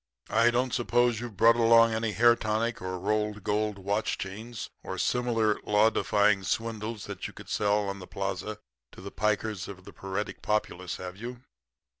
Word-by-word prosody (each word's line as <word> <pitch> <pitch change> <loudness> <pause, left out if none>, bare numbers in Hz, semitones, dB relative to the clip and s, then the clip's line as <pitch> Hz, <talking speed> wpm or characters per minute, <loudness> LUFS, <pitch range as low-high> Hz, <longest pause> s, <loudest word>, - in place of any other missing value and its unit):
I 115 +1 +5
don't 125 +1 0
suppose 120 -2 +2
you've 120 -4 -7
brought 115 0 +6
along 115 0 +6
any 110 -1 -1
hair 120 +2 +6
tonic 110 +1 -1
or 95 0 -3
rolled 105 +1 -1
gold 105 0 0
watch 100 +3 -1
chains, 110 +4 -6
or - - -6
similar 115 -4 +1
law 105 +2 +4
defying 105 -2 +2
swindles 110 +1 -3
that - - -5
you - - -12
could - - -12
sell 105 0 +1
on 100 0 -4
the 90 - -10
plaza 100 +2 -4 0.4
to - - -12
the 100 +1 -8
pikers 105 -2 -1
of 95 -2 -10
the - - -11
paretic 95 +2 -4
populace, 95 -4 -1
have 90 0 -7
you?' 120 +3 -7
105 Hz, 175 wpm, -28 LUFS, 100-115 Hz, 0.4 s, brought